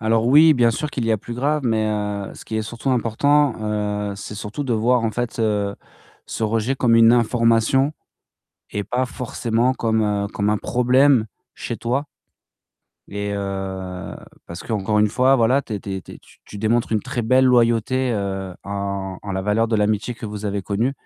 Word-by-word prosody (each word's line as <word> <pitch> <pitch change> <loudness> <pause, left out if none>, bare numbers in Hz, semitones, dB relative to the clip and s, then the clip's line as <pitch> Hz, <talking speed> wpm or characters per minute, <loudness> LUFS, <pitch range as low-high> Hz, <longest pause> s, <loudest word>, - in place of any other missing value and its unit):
Alors 110 +1 +1
oui, 155 +5 +7
bien 120 -4 +3
sûr 145 +6 -3
qu'il 120 -3 -3
y 115 - +2
a - - +2
plus 115 +3 -9
grave, 145 +5 0
mais, 110 -2 +1
heu, 105 -2 -3
ce - - -12
qui - - -7
est - - 0
surtout 120 +4 -4
important, 130 +4 +2 0.6
heu, - - -5
c'est 105 +1 -8
surtout 105 +7 -5
de 125 -4 -1
voir 120 +2 +2
en 115 - 0
fait, 120 +2 -4
heu, 105 -3 0 0.5
ce - - -5
rejet 115 +4 0
comme 120 -3 +3
une 115 0 +7
information 115 +3 +2 0.8
et 105 - -2
pas 125 +5 -1
forcément 125 0 -1
comme, 110 -2 0
heu, 105 -1 0
comme 100 +1 0
un 105 - +2
problème 125 +1 +3 0.3
chez - - -5
toi 130 +5 -1 1.0
et, 100 0 -4
heu, 95 -2 -5 0.3
parce 85 +1 -8
qu'encore 105 -1 -1
une 105 - +4
fois, 130 +5 +3
voilà, 130 +4 +3
tu 110 - -6
es 100 - -4
tu 100 0 -5
es 95 - -4
tu - - -12
es - - -13
tu - - -22
tu 105 - -10
démontres 115 +3 +1
une 110 - +1
très 120 - -4
belle 130 +4 +4
loyauté, 125 +1 +2
heu, 95 -2 -3
en 100 -1 -4
en 100 - -5
la 95 0 -2
valeur 105 +3 +1
de 115 - +1
l'amitié 105 +3 0
que 110 0 -7
vous 105 0 -7
avez 100 -1 -1
connue 105 +7 -1
115 Hz, 200 wpm, -21 LUFS, 105-125 Hz, 1.0 s, oui